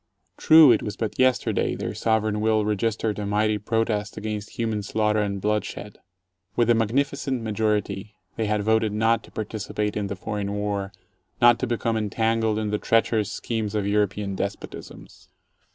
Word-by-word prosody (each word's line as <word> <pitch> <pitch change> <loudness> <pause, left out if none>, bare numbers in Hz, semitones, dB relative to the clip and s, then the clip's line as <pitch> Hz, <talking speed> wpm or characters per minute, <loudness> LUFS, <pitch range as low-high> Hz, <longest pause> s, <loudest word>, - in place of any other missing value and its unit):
True, 155 -4 +7
it 110 - +3
was 105 - -5
but 110 -2 -4
yesterday 130 -1 +2
their - - -4
sovereign 110 -1 0
will 110 -1 +2
registered 105 +1 -1
a 105 - -3
mighty 105 +1 +1
protest 105 -1 -1
against 105 -1 -5
human 110 -2 -1
slaughter 105 +1 0
and 100 -1 -1
bloodshed. 105 0 -3 0.6
With 120 0 +3
a - - +6
magnificent 130 +3 0
majority 105 -1 -1 0.2
they 110 - -1
had 105 0 0
voted 110 0 +2
not 115 +2 +2
to - - -18
participate 105 -1 -3
in 105 -1 -2
the 100 - -4
foreign 100 0 -4
War, 100 -1 -2 0.5
not 120 -1 +6
to 130 - -1
become 115 -1 -1
entangled 110 +1 0
in 110 -1 -2
the 105 - 0
treacherous 110 -2 +1
schemes 110 -3 -3
of 105 -2 0
Euro 105 0 +2
pean 100 0 -5
despotisms. 100 +1 -7
105 Hz, 165 wpm, -24 LUFS, 105-115 Hz, 0.6 s, True